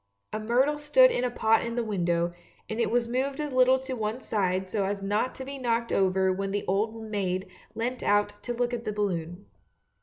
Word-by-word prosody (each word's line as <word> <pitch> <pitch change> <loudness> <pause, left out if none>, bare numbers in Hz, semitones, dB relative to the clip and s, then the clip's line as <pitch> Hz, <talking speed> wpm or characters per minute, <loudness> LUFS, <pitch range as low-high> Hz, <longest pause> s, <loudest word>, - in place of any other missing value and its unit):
A - - -1
myrtle 255 +7 +2
stood - - +6
in 245 - 0
a 250 - +1
pot 225 -2 +2
in 235 0 -3
the 240 - 0
window, 175 -5 0 0.3
and 220 - -4
it 235 - +2
was 240 0 +1
moved 265 +4 -1
a 300 -1 -2
little 255 +1 +5
to 265 0 -5
one 220 +1 -2
side 190 -6 -1
so 200 +2 -1
as 195 0 -2
not 210 +5 0
to 265 - -7
be 275 0 -7
knocked 235 -2 0
over 190 0 +2
when 195 +1 -3
the 205 +1 -2
old 220 +4 0
maid 195 -3 -2 0.3
leant 245 +3 -2
out 205 0 +1
to 245 - -4
look 240 0 -1
at 235 -1 -3
the 215 -2 -3
balloon. 180 -3 -3
220 Hz, 215 wpm, -27 LUFS, 195-245 Hz, 0.3 s, stood